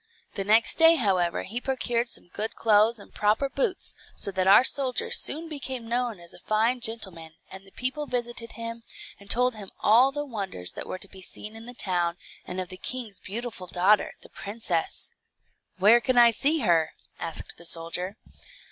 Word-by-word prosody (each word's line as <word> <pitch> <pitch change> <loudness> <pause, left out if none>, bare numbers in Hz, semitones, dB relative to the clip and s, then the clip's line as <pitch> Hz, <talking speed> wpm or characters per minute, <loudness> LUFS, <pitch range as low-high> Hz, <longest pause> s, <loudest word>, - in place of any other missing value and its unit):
The 200 - -2
next 215 +3 +3
day, 325 0 +8
however, 185 - +1
he 235 +5 -4
procured 245 -2 0
some 175 - -4
good 215 +4 -4
clothes 220 +1 +4
and 200 - -14
proper 215 +7 +1
boots, 395 - -1 0.2
so 200 - 0
that 185 0 0
our 200 +5 +8
soldier 275 - 0
soon 330 -7 +1
became 265 -6 -5
known 240 -3 -1
as 170 0 -10
a - - -14
fine 225 +6 +1
gentleman, 190 -9 -4 0.2
and 195 +1 -10
the - - -17
people 260 +6 -2
visited 240 -2 -2
him, 230 0 -6 0.4
and 200 0 -16
told 250 +3 +4
him 205 -3 -9
all 245 +5 +5
the 290 +1 -4
wonders 195 - -4
that - - -7
were - - -4
to 190 - -11
be 190 -1 -13
seen 210 +4 -7
in 225 +1 -10
the 245 - -9
town, 175 -4 0 0.3
and 180 - -5
of 185 -1 -4
the 185 - -9
king's 230 -1 -4
beautiful 215 -2 -6
daughter, 190 +4 +3
the - - -14
princess. 200 -5 -3 0.7
"Where 215 +6 +6
can 255 0 0
I 235 -1 +8
see 290 +7 +1
her?" 170 -7 +2 0.3
asked 165 - -6
the 170 - -10
soldier. 175 +4 -1
220 Hz, 185 wpm, -26 LUFS, 190-245 Hz, 0.7 s, day